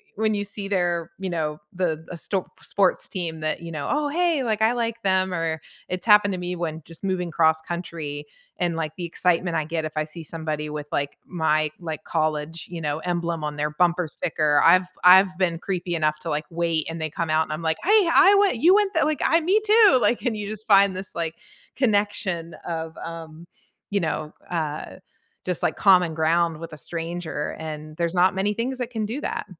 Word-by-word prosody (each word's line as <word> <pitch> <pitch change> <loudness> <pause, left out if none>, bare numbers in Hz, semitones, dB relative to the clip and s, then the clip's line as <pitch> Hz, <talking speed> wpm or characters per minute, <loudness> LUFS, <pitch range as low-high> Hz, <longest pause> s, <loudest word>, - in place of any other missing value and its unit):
when 215 +1 +1
you 205 0 -1
see 200 0 -6
their, 175 -4 0
you 190 -1 -3
know, 155 -3 -2
the 165 -3 -1
a 175 - -6
stop 190 +3 -4
sports 195 -2 +1
team 165 -4 -4
that, 155 +1 -2
you 165 0 -7
know, 145 -3 -4
"Oh, 295 0 +1
hey, 335 -3 +1
like, 220 -2 -1
I 225 - +5
like 230 -1 -2
them," 190 -1 +2
or 165 -2 -2 0.3
it's 180 +2 -4
happened 210 -1 +6
to 180 - -3
me 180 0 -3
when 160 -2 -4
just 165 +3 -12
moving 185 -2 -1
cross-country, 160 -2 -1 0.3
and, 175 -2 0
like, 155 -1 -3
the 175 - -4
excitement 175 0 0
I 155 - -1
get 160 0 -2
if 155 - -4
I 155 0 0
see 160 +1 -9
somebody 155 -1 -4
with, 150 -1 -5
like, 140 0 -2
my, 155 -3 +1
like, 160 -3 -5
college, 155 0 -2
you 170 -2 -6
know, 150 0 -1
emblem 170 -2 -2
on 150 0 -3
their 150 +1 0
bumper 175 +2 +1
sticker. 150 -2 +1
I've 180 +2 +6 0.2
I've 185 0 +7
been 170 -3 0
creepy 180 -2 -3
enough 155 -1 +1
to, 165 - -5
like, 150 0 -1
wait, 165 -2 -1
and 165 0 -5
they 155 -2 -3
come 165 0 -3
out 155 +1 +3
and 155 - -5
I'm 155 - -5
like, 160 -1 0
"Hey, 405 -2 +5
I 385 +2 +7
went 400 -10 +3
you 345 +9 +5
went 410 -2 +2
the 320 - +3
like, 305 -2 -1
I 330 - +4
me 390 +6 +3
too." 425 - +6
Like, 240 - +2
and 240 -4 0
you 205 -1 -4
just 215 +1 -7
find 200 -2 +5
this, 190 +1 -8
like, 165 -1 -2 0.4
connection 205 - 0
of, 160 -1 -4
um, 165 0 -8 0.5
you 200 - +2
know, 155 -2 -3 0.2
uh, 155 -3 -3 0.5
just, 180 -2 -2
like, - - +1
common 180 -4 +5
ground 165 0 +2
with 165 -1 -8
a - - -8
stranger, 165 +1 -4
and 155 -1 -7
there's 170 +1 -1
not 185 +1 +4
many 200 +2 +1
things 255 +2 -3
that 245 -1 -3
can 220 -2 -2
do 250 +8 -4
that. - - -3
170 Hz, 215 wpm, -24 LUFS, 160-200 Hz, 0.5 s, I've